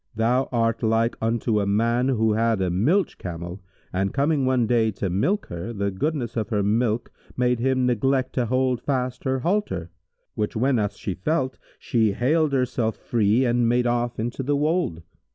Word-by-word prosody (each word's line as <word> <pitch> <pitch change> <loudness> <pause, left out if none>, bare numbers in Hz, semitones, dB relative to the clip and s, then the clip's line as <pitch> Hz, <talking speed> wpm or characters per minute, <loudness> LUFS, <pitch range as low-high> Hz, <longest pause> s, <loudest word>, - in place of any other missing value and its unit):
Thou 120 +4 +1
art 115 -2 +1
like 115 +1 +1
unto 115 -1 +1
a 100 - 0
man 115 +5 +2
who 110 -4 +2
had 115 -1 +1
a 95 -2 0
milch 150 - +1
camel 90 +1 -6 0.3
and, 95 +1 0
coming 140 -1 +2
one 130 -2 +2
day 115 -1 +2
to 95 -1 -3
milk 185 - 0
her, 85 +7 -5
the 100 -2 -1
goodness 125 +3 -2
of 110 -3 -2
her 105 -3 0
milk 110 +2 0 0.3
made 125 -1 +2
him 130 +1 +1
neglect 130 +2 +1
to 125 -3 0
hold 130 0 +1
fast 130 -2 -2
her 130 -1 0
halter; 125 - -1 0.4
which 105 -1 -2
whenas 110 -4 +1
she 95 - -3
felt, 130 - -1 0.2
she 110 -4 +1
haled 150 +7 +2
herself 125 -4 0
free 115 +2 +2
and 120 -1 +2
made 120 +1 +2
off 120 0 0
into 120 +4 -3
the 145 +2 0
wold. 150 - 0
120 Hz, 175 wpm, -24 LUFS, 105-130 Hz, 0.4 s, man